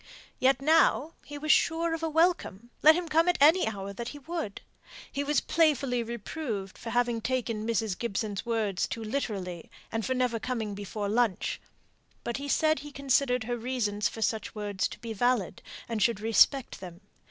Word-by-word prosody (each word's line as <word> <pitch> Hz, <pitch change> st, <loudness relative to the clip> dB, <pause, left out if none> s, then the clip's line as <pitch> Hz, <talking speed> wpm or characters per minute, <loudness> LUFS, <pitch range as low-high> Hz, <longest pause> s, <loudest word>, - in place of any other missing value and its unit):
Yet 265 Hz, 0 st, +3 dB
now 320 Hz, 0 st, +3 dB
he 290 Hz, -, -8 dB
was 305 Hz, +1 st, +1 dB
sure 330 Hz, +1 st, +2 dB
of 325 Hz, -, -3 dB
a 325 Hz, -, -1 dB
welcome, 310 Hz, -, +1 dB
let 310 Hz, +1 st, +8 dB
him 350 Hz, 0 st, -2 dB
come 325 Hz, +3 st, +3 dB
at 355 Hz, -, +2 dB
any 315 Hz, +4 st, +6 dB
hour 200 Hz, -2 st, -4 dB
he 270 Hz, +5 st, -7 dB
would. 300 Hz, -7 st, -5 dB, 0.5 s
He 280 Hz, -, -2 dB
was 295 Hz, +1 st, +1 dB
playfully 280 Hz, -6 st, +2 dB
reproved 230 Hz, -3 st, -5 dB
for 230 Hz, -, -8 dB
having 240 Hz, -1 st, +1 dB
taken 230 Hz, -3 st, -2 dB
Mrs. 220 Hz, -3 st, 0 dB
Gibson's 210 Hz, -3 st, -2 dB
words 220 Hz, -5 st, -1 dB
too 225 Hz, -, -5 dB
literally, 200 Hz, -8 st, -4 dB, 0.2 s
and 225 Hz, 0 st, -2 dB
for 260 Hz, +3 st, -1 dB
never 250 Hz, -2 st, 0 dB
coming 225 Hz, -4 st, -3 dB
before 205 Hz, +1 st, -4 dB
lunch. 220 Hz, -2 st, 0 dB, 0.6 s
But 235 Hz, +1 st, -3 dB
he 280 Hz, +1 st, -5 dB
said 310 Hz, +1 st, +2 dB
he 295 Hz, 0 st, -9 dB
considered 270 Hz, -3 st, +1 dB
her 240 Hz, +2 st, -2 dB
reasons 225 Hz, -4 st, -1 dB
for 225 Hz, -, -4 dB
such 220 Hz, 0 st, -2 dB
words 205 Hz, -3 st, -1 dB
to -, -, -10 dB
be 230 Hz, -1 st, -6 dB
valid, 240 Hz, -3 st, 0 dB, 0.3 s
and 225 Hz, -2 st, -3 dB
should 230 Hz, -1 st, +2 dB
respect 225 Hz, +4 st, +3 dB
them. 180 Hz, -1 st, -10 dB
240 Hz, 175 wpm, -29 LUFS, 215-285 Hz, 0.6 s, let